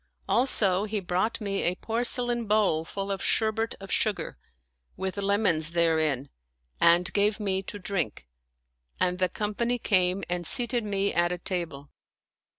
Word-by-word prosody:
Also, 205 -6 +2
he 215 0 -2
brought 185 +4 -1
me 200 -2 -2
a 175 - +1
porce 230 +5 +2
lain 240 -2 -2
bowl 205 -7 +2
full 195 +4 -5
of 195 - -3
sherbet 225 +1 +1
of 195 0 -9
sugar, 215 -3 0 0.6
with 190 -1 -3
lemons 195 -6 +1
therein, 160 -5 +1 0.5
and 175 +2 +4
gave 205 +1 +2
me 190 -2 0
to 195 - -6
drink; 180 - -3 0.7
and 180 0 +1
the 185 -1 +2
company 220 +6 -2
came 185 -4 +2
and 175 -1 -3
seated 240 -1 +1
me 200 -1 -1
at 175 0 +2
a 180 - -2
table. 170 -6 -4
195 Hz, 150 wpm, -27 LUFS, 175-215 Hz, 0.7 s, and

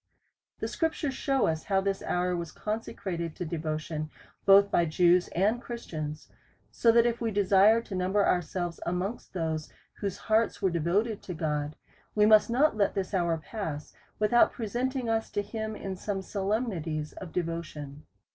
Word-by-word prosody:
The - - 0
scriptures 320 -4 -1
shew 270 -1 +1
us 160 -1 -1
how 195 -2 +2
this 195 0 -1
hour 180 0 0
was 170 -2 -4
conse 215 +2 -4
crated 170 -4 -4
to 180 - -4
devotion, 155 -1 -3 0.4
both 200 +1 +7
by 170 - +3
Jews 175 +2 +4
and 210 +7 +1
Christians: 155 -12 -6 0.4
so 230 - +4
that 235 0 +5
if 235 0 0
we 230 - +1
desire 205 +2 +5
to 210 - -9
number 190 +2 +2
ourselves 175 0 -1
amongst 180 +6 -3
those 160 -3 -2 0.3
whose 200 -2 -3
hearts 220 +1 +1
were 190 - +1
devoted 190 +7 +1
unto 180 - -7
God, 150 -2 -2 0.4
we 210 -1 +5
must 215 +1 +6
not 260 +2 +3
let 205 -2 +1
this 195 0 -2
hour 170 -3 +1
pass 160 -3 -6 0.2
without 215 +3 +4
presenting 245 +3 -2
us 225 0 0
to 205 -1 -1
him 220 +1 -4
in 195 -2 -5
some 195 +1 -3
solemnities 190 -7 -2
of 180 -4 -9
devotion. 155 -4 -5
190 Hz, 165 wpm, -29 LUFS, 165-220 Hz, 0.4 s, both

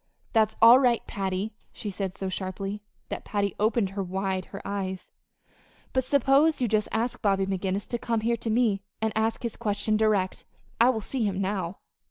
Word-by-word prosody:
"That's 220 -1 +3
all 235 +3 +10
right, 245 -3 +2
Patty," 195 +2 -3 0.2
she 210 - -5
said 190 -1 -4
so 195 - -4
sharply 195 +2 -4 0.3
that - - -4
Patty 200 -2 -1
opened 215 -2 +2
wide 190 -1 -2
her 195 - -8
eyes; 190 -2 -4 0.8
"but 260 - +2
suppose 280 +4 +3
you 250 - +1
just 215 -1 +1
ask 235 +2 -1
Bobby 195 -2 +2
McGinnis 190 +1 -2
to 240 - -2
come 230 -2 -1
here 235 +1 +1
to 230 - -4
me 220 -3 +2 0.2
and 220 -1 0
ask 220 +2 0
his 235 - -3
question 215 -1 0
direct. 210 -4 +1 0.4
I 235 +2 +6
will 225 -4 0
see 250 +3 -2
him 195 -2 0
now." 190 -2 -2
210 Hz, 180 wpm, -27 LUFS, 195-230 Hz, 0.8 s, all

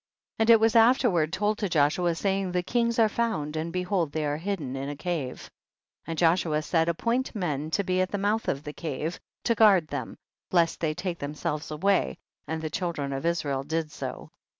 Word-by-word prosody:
25. 225 - +3
And 230 +1 +8
it - - +3
was 225 0 +3
afterward 225 - +4
told 205 +3 0
to 205 - -1
Joshua, 165 +2 +2
saying, 195 +1 0
the 180 0 +1
kings 235 +3 0
are 225 -2 +5
found 200 -10 -1
and 160 +2 -2
behold 180 -3 -1
they 155 0 -2
are 145 0 -1
hidden 160 -7 -3
in 135 +1 -4
a 145 - -4
cave. 150 -5 -3 0.6
26. - - -28
And 165 -1 -4
Joshua 165 -2 +2
said, 165 0 +1
appoint 235 +10 -1
men 155 -6 -2
to 200 +5 0
be 185 0 +1
at 185 - 0
the 205 - -2
mouth 210 +3 0
of 140 +1 -1
the 150 -1 -6
cave, 160 +2 -4 0.2
to 235 - +2
guard 200 -8 +5
them, - - -5 0.3
lest 170 -2 +2
they 155 -2 -1
take 180 -1 -4
them 145 +1 -5
selves 150 0 -3
away; 155 - +1 0.3
and 160 +1 -3
the 155 - -3
children 155 -6 -2
of 135 +4 -2
Is 170 -2 0
rael 135 -2 -1
did 155 +2 -2
so. 135 -3 -6
170 Hz, 215 wpm, -27 LUFS, 150-200 Hz, 0.6 s, And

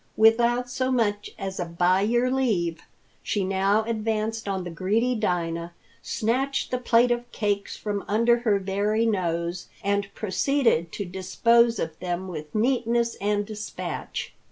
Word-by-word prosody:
Without 235 +3 +4
so 255 +1 -1
much 210 -4 0
as 190 -1 -5
a 175 - -1
"by 175 +3 +2
your 240 +4 +2
leave," 185 -11 0 0.4
she 205 - -1
now 195 +3 +2
advanced 220 -1 -2
on 190 -2 -1
the 175 - -6
greedy 210 +8 +1
Dinah, 170 -6 -1 0.3
snatched 265 +5 -1
the 250 - 0
plate 240 0 +4
of 240 0 -2
cakes 205 -2 -2
from 205 -2 -3
under 230 +3 +3
her 220 -4 +2
very 200 +3 0
nose, 175 -4 -1 0.2
and 200 0 0
proceeded 215 - +1
to 200 - -3
dispose 230 +6 +3
of 160 -4 -4
them 180 +1 -3
with 155 -2 -7
neatness 235 0 +1
and 205 0 +1
despatch. 215 0 -5
210 Hz, 145 wpm, -25 LUFS, 185-235 Hz, 0.4 s, Without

